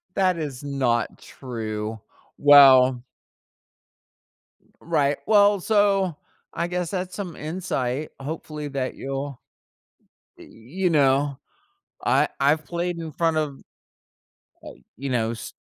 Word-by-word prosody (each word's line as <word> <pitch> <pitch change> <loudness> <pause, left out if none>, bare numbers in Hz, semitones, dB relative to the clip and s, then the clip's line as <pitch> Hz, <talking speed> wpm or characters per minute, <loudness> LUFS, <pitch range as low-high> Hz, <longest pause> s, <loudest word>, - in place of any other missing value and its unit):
That 185 -3 +2
is 145 -4 -5
not 130 -5 -1
true. 110 -3 -6 0.4
Well 130 -3 +7 1.8
Right, 145 -4 +1
well, 205 -2 +5
so, 195 -4 +2 0.4
I 170 +1 -2
guess 180 -1 -3
that's 185 -1 -4
some 190 -5 -6
insight, 150 -4 -3
hopefully, 150 +1 -6
that 135 -2 -3
you'll 135 -1 -5 1.0
y - - -13
you 170 +12 -3
know, 140 -2 +2 0.7
I - - +3
I've 150 +3 +2
played 175 +1 -3
in 160 -2 -6
front 165 0 0
of, 150 -3 -2 1.2
uh, - - -22 0.2
you 135 +2 -5
know 115 -2 0
s 115 - -8
145 Hz, 110 wpm, -24 LUFS, 130-175 Hz, 1.8 s, Well